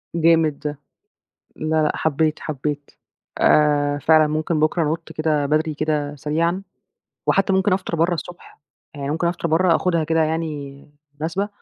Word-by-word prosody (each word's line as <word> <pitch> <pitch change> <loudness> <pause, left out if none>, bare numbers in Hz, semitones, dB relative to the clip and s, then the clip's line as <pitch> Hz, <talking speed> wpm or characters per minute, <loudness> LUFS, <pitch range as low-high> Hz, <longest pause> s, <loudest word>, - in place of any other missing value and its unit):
جامد 165 -3 +3
ده. 150 -1 -5 0.8
لا، 155 0 0
لأ 150 - +2
حبيت، 155 0 0
حبيت. 145 -1 -4 0.5
آآ، 145 -1 +3
فعلًا 155 0 +5
ممكن 155 +1 -1
بكره 155 +2 +2
أنُط 160 +2 -3
كده 155 -2 0
بدري 155 +2 +1
كده 150 -1 -2
سريعًا، 165 +6 -1 0.7
وحتى 195 0 +2
ممكن 190 +1 +2
أفطر 185 -2 -1
برّه 170 +2 +2
الصبح، 175 -1 -9 0.3
يعني 140 -1 -4
ممكن 165 +3 -1
أفطر 170 0 -1
برّه 165 +1 +3
آخدها 170 -3 0
كده 160 +1 +2
يعني 150 -3 -3 0.4
مناسبة، 185 +6 -2
155 Hz, 145 wpm, -21 LUFS, 150-165 Hz, 0.8 s, فعلًا